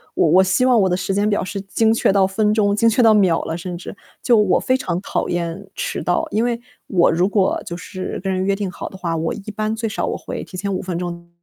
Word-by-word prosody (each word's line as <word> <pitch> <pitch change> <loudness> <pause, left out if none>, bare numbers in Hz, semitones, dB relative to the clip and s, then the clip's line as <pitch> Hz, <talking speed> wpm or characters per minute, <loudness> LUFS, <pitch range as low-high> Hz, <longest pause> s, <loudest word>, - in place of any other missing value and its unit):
我 160 - +3
我 185 +4 +6
希 190 +7 +2
望 250 -3 +4
我 190 - +2
的 180 - +1
时 185 +1 -2
间 205 +2 +1
表 205 - 0
是 195 +1 -5
精 220 +3 +1
确 225 - +2
到 195 -1 +4
分 210 +2 +1
钟、 205 -2 +2
精 230 +2 +4
确 225 - +2
到 225 -2 +6
秒 190 -6 +3
了， 160 - -4
甚 175 0 -6
至。 180 - -9 0.3
就 240 - +4
我 210 -3 +3
非 255 - +1
常 175 -8 -2
讨 - - -2
厌 175 +3 -3
迟 - - -3
到， 175 - 0
因 220 - +1
为， 240 -1 -1 0.3
我 175 -3 +3
如 175 +4 +2
果 200 -2 +1
就 170 - -5
是 185 +1 -6
跟 195 - -1
人 185 0 -1
约 200 - +2
定 200 -1 -3
好 - - -7
的 190 - -11
话， 170 -3 -2
我 165 +1 -1
一 210 +1 -7
般 215 +1 -1
最 225 0 -2
少 210 - -2
我 - - -2
会 - - -6
提 185 - -10
前 200 +1 -2
5 185 - -2
分 180 -2 -4
钟 170 -1 -6
195 Hz, 290 characters per minute, -20 LUFS, 180-215 Hz, 0.3 s, 我